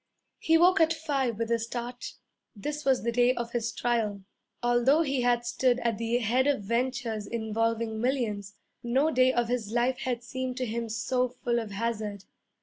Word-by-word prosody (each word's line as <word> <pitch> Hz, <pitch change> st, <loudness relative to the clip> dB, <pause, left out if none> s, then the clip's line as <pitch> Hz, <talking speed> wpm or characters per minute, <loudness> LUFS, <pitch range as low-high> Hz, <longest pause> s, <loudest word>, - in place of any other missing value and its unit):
He 325 Hz, 0 st, +4 dB
woke 360 Hz, +2 st, +5 dB
at 325 Hz, 0 st, +4 dB
five 275 Hz, -8 st, -1 dB
with 230 Hz, 0 st, -2 dB
a 230 Hz, -, +2 dB
start. 240 Hz, +2 st, -5 dB, 0.4 s
This 295 Hz, +9 st, -4 dB
was 265 Hz, -4 st, +2 dB
the 235 Hz, -, 0 dB
day 245 Hz, +2 st, +3 dB
of 235 Hz, -1 st, -4 dB
his 235 Hz, -1 st, -1 dB
trial. 220 Hz, -5 st, -1 dB, 0.4 s
Although 240 Hz, +6 st, +4 dB
he 275 Hz, -4 st, 0 dB
had 240 Hz, -1 st, +2 dB
stood 245 Hz, +1 st, +2 dB
at 230 Hz, -2 st, -1 dB
the 230 Hz, +1 st, +1 dB
head 245 Hz, +3 st, +1 dB
of 280 Hz, -8 st, +1 dB
ventures 235 Hz, -1 st, -1 dB
involving 225 Hz, 0 st, -1 dB
millions, 215 Hz, -6 st, -1 dB, 0.3 s
no 265 Hz, +6 st, +2 dB
day 255 Hz, -2 st, +4 dB
of 240 Hz, -2 st, 0 dB
his 235 Hz, -3 st, -2 dB
life 245 Hz, +2 st, +1 dB
had 250 Hz, -4 st, -2 dB
seemed 255 Hz, +1 st, -4 dB
to 255 Hz, -, -1 dB
him 230 Hz, 0 st, -3 dB
so 250 Hz, +3 st, 0 dB
full 240 Hz, -1 st, -1 dB
of 225 Hz, -2 st, -5 dB
hazard. 210 Hz, -1 st, -3 dB
240 Hz, 180 wpm, -28 LUFS, 230-255 Hz, 0.4 s, woke